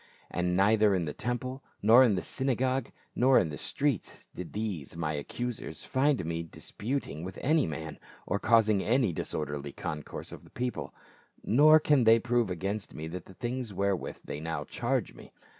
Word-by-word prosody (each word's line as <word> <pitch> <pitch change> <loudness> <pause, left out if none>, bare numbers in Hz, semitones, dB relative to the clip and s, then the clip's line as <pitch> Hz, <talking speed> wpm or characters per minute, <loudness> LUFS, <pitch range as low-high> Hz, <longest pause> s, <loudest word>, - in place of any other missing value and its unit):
And 90 0 0
neither 105 +1 +4
in 90 -3 0
the 75 - -4
temple, 125 +3 -3 0.2
nor 115 +5 +8
in 115 -6 +4
the 90 - -2
synagogues, 130 -1 0 0.3
nor 130 +2 +5
in 80 - +3
the 75 - -5
streets, 140 -7 -2
did 90 - -7
these 95 -9 -4
my 80 -2 -1
accusers 120 - -5
find 130 - +1
me 85 0 -2
disputing 95 - -4
with 95 +1 -7
any 155 +2 +3
man, 80 +1 -6 0.3
or 100 - -1
causing 110 -3 +4
any 115 -3 +2
disorderly 75 -2 -3
concourse 75 -1 -6
of - - -12
people; 125 0 -3 0.5
nor 155 +7 +6
can 145 -5 +3
they 115 +1 +7
prove 120 -2 +1
against 95 +4 -3
me 80 +1 -5
the 90 +3 -5
things 120 +3 -5
wherewith 100 -1 -1
they 75 - -5
now 80 -1 -3
charge - - -1
me. - - -14
105 Hz, 165 wpm, -30 LUFS, 85-125 Hz, 0.5 s, nor